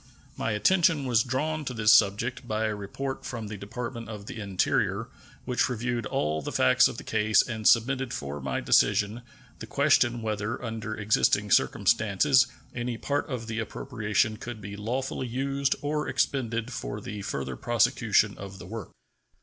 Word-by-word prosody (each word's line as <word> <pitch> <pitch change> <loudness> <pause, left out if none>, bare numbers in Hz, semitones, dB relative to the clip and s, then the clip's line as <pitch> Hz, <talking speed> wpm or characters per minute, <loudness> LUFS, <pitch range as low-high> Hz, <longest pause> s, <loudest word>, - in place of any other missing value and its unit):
My 110 - -1
attention 160 - +3
was 120 -4 +3
drawn 150 +6 -1
to 125 - -4
this 105 -1 +5
subject 115 +5 +2
by 110 0 0
a 110 - 0
report 120 +7 -5
from 115 -4 -5
the 105 - -5
Department 115 +3 -6
of 105 -2 -7
the 110 - -7
Interior, 100 -3 0 0.4
which 125 0 +1
reviewed 120 -1 -2
all 75 -3 -1
the - - -5
facts 65 - +5
of - - -7
the - - -7
case 110 -1 +3
and 110 -3 -1
submitted 130 +2 +3
for 70 - -5
my 65 -1 -2
decision 105 +4 +3 0.4
the - - -7
question 120 -1 +2
whether 105 +1 -2
under 110 -1 -4
existing 105 -1 +2
circumstances 115 +6 +3 0.3
any 120 -1 -3
part 145 +5 -2
of 125 -4 -4
the 115 0 -4
appropriation 110 -2 -1
could 120 0 -7
be 100 0 -7
lawfully 125 +5 -3
used 135 +3 0
or 150 +1 -1
expended 125 -2 -1
for 115 -3 -5
the 105 0 -6
further 65 -8 -4
prosecution - - +2
of 100 0 -8
the 90 - -10
work. 110 -1 -7
115 Hz, 165 wpm, -27 LUFS, 105-125 Hz, 0.4 s, this